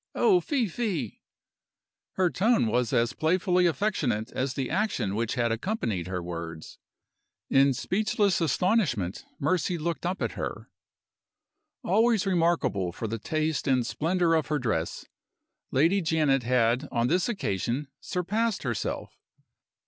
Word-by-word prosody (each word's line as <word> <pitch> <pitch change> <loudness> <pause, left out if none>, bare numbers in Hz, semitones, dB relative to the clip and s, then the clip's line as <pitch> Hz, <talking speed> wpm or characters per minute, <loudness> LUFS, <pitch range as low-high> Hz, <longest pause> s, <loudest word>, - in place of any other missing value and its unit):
Oh, 385 -5 +4
fie, 280 -9 0
fie!" 175 - -3 0.9
Her 185 -2 +1
tone 220 - +3
was 120 +1 0
as 115 +2 +2
playfully 180 +3 +2
affectionate 135 - -1
as 130 0 -2
the 135 -2 -2
action 185 - 0
which 115 +2 -1
had 120 -2 +1
accompanied 115 - -2
her 90 -2 -3
words. 85 -2 -7 0.7
In 135 +1 +5
speechless 205 - +1
astonishment 155 - +1 0.2
Mercy 170 +3 0
looked 170 +2 -2
up 185 +2 -2
at - - -1
her. - - -6 1.1
Always 225 0 +3
remarkable 165 - +1
for 110 - -5
the 115 +1 -4
taste 155 +4 -1
and 130 -3 +2
splendor 165 +5 +1
of 160 -2 +1
her 150 - 0
dress, 110 - -2 0.6
Lady 165 +9 +3
Janet 155 -5 +2
had 125 +2 +1
on 115 -1 +1
this 180 - +1
occasion 125 - -2
surpassed 210 +5 -1
herself. 120 -5 -3
150 Hz, 130 wpm, -27 LUFS, 115-185 Hz, 1.1 s, In